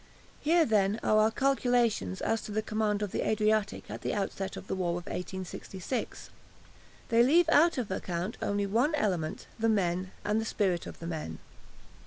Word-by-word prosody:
Here, 330 Hz, +2 st, +4 dB
then, 210 Hz, -2 st, +2 dB
are 215 Hz, -, +4 dB
our 215 Hz, +1 st, +5 dB
calculations 245 Hz, -, +1 dB
as 225 Hz, -1 st, 0 dB
to 210 Hz, -, -8 dB
the 215 Hz, +1 st, -1 dB
command 215 Hz, -1 st, 0 dB
of 205 Hz, -, -3 dB
the -, -, -1 dB
Adriatic 215 Hz, -1 st, +1 dB
at -, -, -6 dB
the -, -, -2 dB
outset 195 Hz, -1 st, -3 dB
of -, -, -8 dB
the -, -, -3 dB
war 185 Hz, -2 st, -1 dB
of 175 Hz, 0 st, -4 dB
1866. 190 Hz, +4 st, -5 dB, 0.8 s
They 230 Hz, 0 st, +5 dB
leave 315 Hz, +7 st, +5 dB
out 330 Hz, 0 st, +5 dB
of 235 Hz, -6 st, -2 dB
account 180 Hz, +2 st, -3 dB
only 205 Hz, 0 st, 0 dB
one 240 Hz, +10 st, +2 dB
element 180 Hz, -, -1 dB
the 225 Hz, 0 st, +2 dB
men, 185 Hz, -3 st, +1 dB, 0.2 s
and 210 Hz, +2 st, +1 dB
the -, -, -4 dB
spirit 190 Hz, -6 st, 0 dB
of -, -, -8 dB
the 165 Hz, -, -8 dB
men. 155 Hz, -, -4 dB
210 Hz, 180 wpm, -30 LUFS, 190-230 Hz, 0.8 s, our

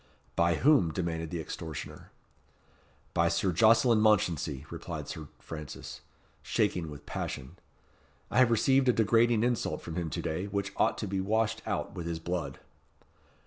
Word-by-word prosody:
"By 85 Hz, 0 st, +3 dB
whom?" 130 Hz, -, +4 dB
demanded 80 Hz, -2 st, -3 dB
the 85 Hz, 0 st, -4 dB
extortioner. 80 Hz, -1 st, -7 dB, 1.0 s
"By -, -, +3 dB
Sir 95 Hz, -, +1 dB
Jocelyn 115 Hz, +5 st, +5 dB
Mounchensey," 85 Hz, -9 st, +2 dB
replied -, -, -6 dB
Sir 80 Hz, -2 st, -7 dB
Francis, 75 Hz, -4 st, -8 dB, 0.4 s
shaking 85 Hz, -3 st, 0 dB
with 75 Hz, -1 st, -10 dB
passion. 65 Hz, +8 st, -5 dB, 0.7 s
"I -, -, +3 dB
have 130 Hz, -2 st, +6 dB
received 130 Hz, +3 st, +3 dB
a -, -, +5 dB
degrading 115 Hz, +1 st, +3 dB
insult 120 Hz, -1 st, -1 dB
from 80 Hz, +1 st, -6 dB
him 85 Hz, -2 st, -2 dB
to -, -, -3 dB
day, 80 Hz, +5 st, -2 dB
which 100 Hz, 0 st, -3 dB
ought -, -, +2 dB
to 105 Hz, -, -3 dB
be 95 Hz, 0 st, -1 dB
washed 110 Hz, +2 st, 0 dB
out -, -, -2 dB
with 85 Hz, -1 st, -5 dB
his 85 Hz, -1 st, -2 dB
blood." 85 Hz, +2 st, -3 dB
90 Hz, 150 wpm, -30 LUFS, 80-110 Hz, 1.0 s, have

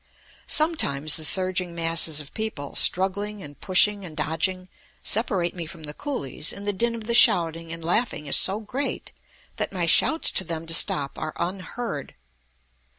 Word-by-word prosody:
Sometimes 155 Hz, -, +2 dB
the 160 Hz, -, -4 dB
surging 185 Hz, +1 st, 0 dB
masses 165 Hz, -2 st, +2 dB
of 145 Hz, -2 st, -9 dB
people, 215 Hz, -11 st, -5 dB
struggling 200 Hz, +2 st, +1 dB
and 145 Hz, -1 st, -13 dB
pushing 200 Hz, +2 st, +3 dB
and 160 Hz, -4 st, -11 dB
dodging, 160 Hz, +5 st, -2 dB, 0.4 s
separate 195 Hz, -6 st, -1 dB
me 170 Hz, -3 st, -7 dB
from 160 Hz, 0 st, -11 dB
the 150 Hz, -1 st, -7 dB
coolies, 155 Hz, -, -5 dB
and 200 Hz, -, -9 dB
the 205 Hz, -, -1 dB
din 230 Hz, +4 st, -1 dB
of 225 Hz, -, -8 dB
the 235 Hz, +2 st, -3 dB
shouting 165 Hz, -8 st, +5 dB
and 165 Hz, -1 st, -8 dB
laughing 175 Hz, -3 st, -1 dB
is 140 Hz, -, +1 dB
so 195 Hz, +3 st, +3 dB
great 250 Hz, +6 st, -5 dB, 0.5 s
that -, -, -3 dB
my 180 Hz, -3 st, -2 dB
shouts 315 Hz, -, +4 dB
to -, -, +1 dB
them 165 Hz, -2 st, -6 dB
to 165 Hz, -, -1 dB
stop 145 Hz, -4 st, +3 dB
are 155 Hz, 0 st, -5 dB
unheard. 185 Hz, -1 st, -6 dB
180 Hz, 165 wpm, -24 LUFS, 160-210 Hz, 0.5 s, shouting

